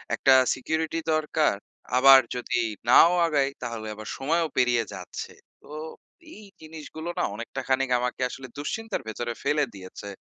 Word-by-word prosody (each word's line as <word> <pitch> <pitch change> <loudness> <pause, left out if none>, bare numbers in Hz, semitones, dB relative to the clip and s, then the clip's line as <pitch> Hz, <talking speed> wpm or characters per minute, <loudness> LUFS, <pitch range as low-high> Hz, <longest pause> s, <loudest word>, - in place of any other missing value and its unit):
একটা 135 - +3 0.2
সিকিউরিটি 160 +5 -2 0.2
দরকার, 155 -4 +1 0.4
আবার 135 +1 +9 0.2
যদি 125 - -3 0.3
নাও 165 +7 +8
আগাই 145 -4 +2
তাহলে 115 -3 -5
আবার 110 0 -9
সময়ও 165 +5 0
পেরিয়ে 120 -2 +3
যাচ্ছে। - - -7 0.3
তো - - -19 0.7
এই 215 - -12 0.2
জিনিসগুলো 160 +1 -8
না - - +1
অনেকটা 120 +4 -6
খানিক 135 0 +1
আমাকে 125 +1 -3
আসলে 130 +1 -9
দুশ্চিন্তার 225 +10 -4
ভেতরে 120 +2 -4
ফেলে 150 0 +2
দিয়েছে। 95 +1 -10
135 Hz, 140 wpm, -26 LUFS, 120-155 Hz, 0.7 s, আবার